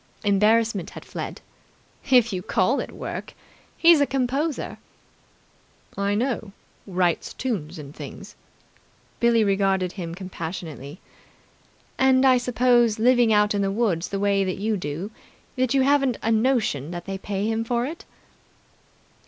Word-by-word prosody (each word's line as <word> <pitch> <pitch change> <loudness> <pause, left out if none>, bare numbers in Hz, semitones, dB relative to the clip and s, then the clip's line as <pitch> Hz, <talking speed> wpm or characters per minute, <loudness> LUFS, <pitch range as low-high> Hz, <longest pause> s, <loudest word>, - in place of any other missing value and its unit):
Embarrassment 210 -1 +2
had - - -11
fled. - - -6 0.7
"If 240 -4 +5
you 185 - -2
call 190 +8 +1
it - - -5
work. - - -7 0.4
He's 330 -3 +6
a 285 - +3
composer." 275 +4 -2 1.2
"I 200 +1 0
know. 225 -3 -2 0.3
Writes 180 -3 0
tunes 185 - -3
and 145 0 -10
things." - - -9 0.8
Billie 235 -1 +4
regarded 195 -2 +1
him 170 -4 -6
compassionately. 165 -4 -7 1.0
"And 265 0 +4
I 255 -1 +5
suppose, 245 -2 +3
living 240 0 +4
out 210 0 +3
in 205 - 0
the 195 - +1
woods 195 -6 0
the 200 - -3
way 200 -1 +2
that 185 -1 -2
you 215 +2 -1
do 175 +3 -5 0.4
that 255 0 +1
you 265 - +4
haven't 275 -3 +2
a 225 - +1
notion 220 - +1
that 175 0 -6
they 195 0 -5
pay 200 0 -3
him 225 +1 0
for 235 +1 -1
it." 320 +5 -7
210 Hz, 140 wpm, -24 LUFS, 190-245 Hz, 1.2 s, He's